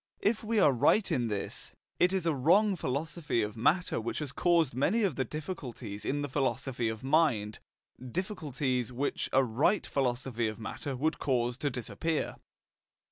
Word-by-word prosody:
If 215 Hz, +2 st, +1 dB
we 225 Hz, 0 st, +1 dB
are 150 Hz, -, +6 dB
right 165 Hz, -, +3 dB
in 120 Hz, -2 st, +1 dB
this, 105 Hz, -3 st, -4 dB, 0.3 s
it 180 Hz, -, +4 dB
is 190 Hz, -3 st, 0 dB
a 165 Hz, -, +2 dB
wrong 190 Hz, +10 st, +4 dB
philosophy 150 Hz, -3 st, -1 dB
of 105 Hz, 0 st, -4 dB
matter 155 Hz, +5 st, +2 dB
which 115 Hz, -, -3 dB
has 150 Hz, -4 st, -3 dB
caused 170 Hz, -4 st, +2 dB
many 175 Hz, -, +2 dB
of 185 Hz, -9 st, +1 dB
the 130 Hz, -, 0 dB
difficulties 125 Hz, -, -6 dB
in 145 Hz, +1 st, -1 dB
the -, -, -1 dB
philosophy 130 Hz, -3 st, -1 dB
of 110 Hz, +1 st, -6 dB
mind 135 Hz, -8 st, +2 dB, 0.4 s
difficulties 135 Hz, -, -2 dB
which 130 Hz, +4 st, -2 dB
a 135 Hz, -, +4 dB
right 135 Hz, -, +2 dB
philosophy 125 Hz, -3 st, -1 dB
of 110 Hz, -, -4 dB
matter 130 Hz, +4 st, -5 dB
would 155 Hz, +5 st, 0 dB
cause 120 Hz, -3 st, 0 dB
to 145 Hz, -, 0 dB
disappear. 145 Hz, +6 st, -2 dB
135 Hz, 165 wpm, -30 LUFS, 120-165 Hz, 0.4 s, are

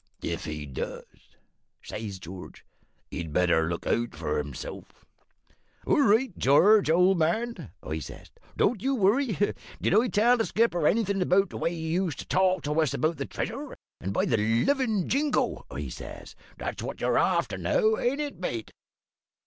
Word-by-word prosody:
"`If 85 Hz, +1 st, -3 dB
he 75 Hz, -2 st, -5 dB
does,' 65 Hz, -3 st, -8 dB, 0.5 s
says 105 Hz, -3 st, -6 dB
George, 90 Hz, +1 st, -10 dB, 0.5 s
`he'd 80 Hz, -3 st, -5 dB
better 85 Hz, -1 st, +2 dB
look 85 Hz, -, -4 dB
out 120 Hz, 0 st, 0 dB
for 75 Hz, -2 st, -1 dB
hisself!' 75 Hz, -3 st, -9 dB, 0.8 s
"`All 290 Hz, -, +3 dB
right, 220 Hz, -1 st, +3 dB
George, 190 Hz, +8 st, +5 dB
old 180 Hz, +2 st, +4 dB
man,' 170 Hz, -, -1 dB
I 80 Hz, +1 st, -3 dB
says; -, -, -10 dB, 0.3 s
`don't 215 Hz, -3 st, +2 dB
you 270 Hz, +3 st, +1 dB
worry. 220 Hz, +1 st, +2 dB, 0.4 s
Did -, -, +1 dB
I 225 Hz, +5 st, +4 dB
tell 235 Hz, +3 st, +4 dB
the 225 Hz, -, +1 dB
skipper 195 Hz, -9 st, +2 dB
anything 200 Hz, -3 st, +1 dB
about 185 Hz, +1 st, +3 dB
the -, -, -6 dB
way 170 Hz, -, 0 dB
you 170 Hz, +2 st, -1 dB
used 160 Hz, -6 st, -4 dB
to -, -, -7 dB
talk 185 Hz, -2 st, +2 dB
to 150 Hz, +2 st, +1 dB
us 155 Hz, -, 0 dB
about 160 Hz, +1 st, 0 dB
the -, -, -4 dB
treasure 275 Hz, +5 st, -5 dB, 0.2 s
and, 95 Hz, -, -4 dB
by -, -, +1 dB
the 115 Hz, -, +2 dB
livin' 195 Hz, -, +1 dB
Jingo,' 285 Hz, +2 st, 0 dB
I -, -, -5 dB
says, -, -, -9 dB, 0.2 s
`that's -, -, -4 dB
what -, -, -5 dB
you're -, -, +2 dB
after -, -, +1 dB
now, 445 Hz, -2 st, +2 dB
ain't 275 Hz, +5 st, 0 dB
it, 290 Hz, -1 st, -5 dB
mate?' 115 Hz, -, -4 dB
180 Hz, 165 wpm, -27 LUFS, -, 0.8 s, George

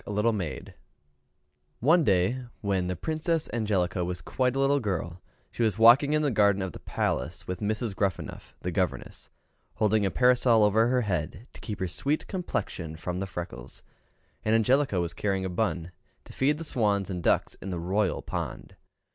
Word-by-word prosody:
One 160 Hz, +7 st, +4 dB
day, 100 Hz, +4 st, +2 dB, 0.2 s
when 95 Hz, -3 st, 0 dB
the 90 Hz, -, -2 dB
Princess 160 Hz, -, -1 dB
Angelica 95 Hz, -6 st, 0 dB
was 90 Hz, 0 st, -4 dB
quite 125 Hz, 0 st, 0 dB
a -, -, 0 dB
little 140 Hz, +1 st, +3 dB
girl, 90 Hz, -6 st, -3 dB, 0.3 s
she -, -, -5 dB
was 110 Hz, -4 st, +2 dB
walking 120 Hz, +6 st, +7 dB
in 155 Hz, 0 st, +2 dB
the 145 Hz, -, +1 dB
garden 100 Hz, -3 st, +3 dB
of 95 Hz, -, -3 dB
the -, -, -10 dB
palace, 80 Hz, +7 st, -2 dB
with 90 Hz, -1 st, -4 dB
Mrs. 110 Hz, 0 st, -2 dB
Gruffanuff, 95 Hz, -5 st, -3 dB
the 90 Hz, -, -3 dB
governess, 90 Hz, +1 st, -3 dB, 0.5 s
holding 110 Hz, -1 st, +2 dB
a 100 Hz, -, +2 dB
parasol 125 Hz, -1 st, +4 dB
over 110 Hz, +2 st, +4 dB
her 125 Hz, 0 st, +2 dB
head, 90 Hz, 0 st, -3 dB
to -, -, -12 dB
keep 105 Hz, -3 st, -5 dB
her 95 Hz, -, -1 dB
sweet 140 Hz, -, -1 dB
complexion 95 Hz, -, -4 dB
from 90 Hz, +2 st, -4 dB
the 95 Hz, -, -3 dB
freckles, 70 Hz, -8 st, -8 dB, 0.6 s
and 110 Hz, +1 st, +2 dB
Angelica 125 Hz, -2 st, +3 dB
was 85 Hz, -1 st, -2 dB
carrying 95 Hz, -2 st, -1 dB
a -, -, -2 dB
bun, 90 Hz, -3 st, -2 dB, 0.3 s
to -, -, -13 dB
feed 145 Hz, +3 st, +1 dB
the 165 Hz, -, -5 dB
swans 105 Hz, -, 0 dB
and 90 Hz, -1 st, -3 dB
ducks -, -, +1 dB
in 95 Hz, -, -6 dB
the 90 Hz, -, -3 dB
royal 95 Hz, +1 st, 0 dB
pond. -, -, -5 dB
100 Hz, 170 wpm, -27 LUFS, 90-125 Hz, 0.6 s, walking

